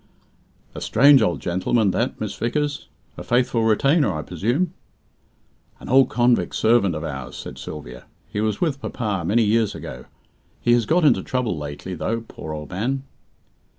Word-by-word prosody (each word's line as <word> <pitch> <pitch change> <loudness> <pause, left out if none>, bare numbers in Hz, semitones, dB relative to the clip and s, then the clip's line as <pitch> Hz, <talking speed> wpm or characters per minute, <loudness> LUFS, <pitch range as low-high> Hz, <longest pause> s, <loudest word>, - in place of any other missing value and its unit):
"A - - -7
strange 135 +3 +6
old 90 -5 0
gentleman, 95 +4 +1
that, - - -1
Miss - - -3
Vickers. 145 +5 -2 0.3
A - - -6
faithful 120 -2 +1
retainer, 135 - +3
I 75 -3 -4
presume?" 120 - -1 1.1
"An - - -10
old 135 +1 +5
convict 120 0 +2
servant 110 -6 +3
of 75 - -4
ours," 70 -4 -6
said - - -8
Sylvia. 65 -5 -8 0.2
"He 105 - -3
was 110 -1 -1
with 145 -5 -1
papa 105 -4 -3
many 110 +7 +2
years 110 0 +1
ago. - - -8 0.5
He 120 - +3
has 120 -3 +2
got 170 +3 +3
into 145 - +4
trouble 125 -7 -1
lately, 75 +5 -6
though, 115 +5 -2
poor 80 -8 -9
old 75 -2 -7
man." 130 +9 -2
110 Hz, 160 wpm, -22 LUFS, 90-125 Hz, 1.1 s, strange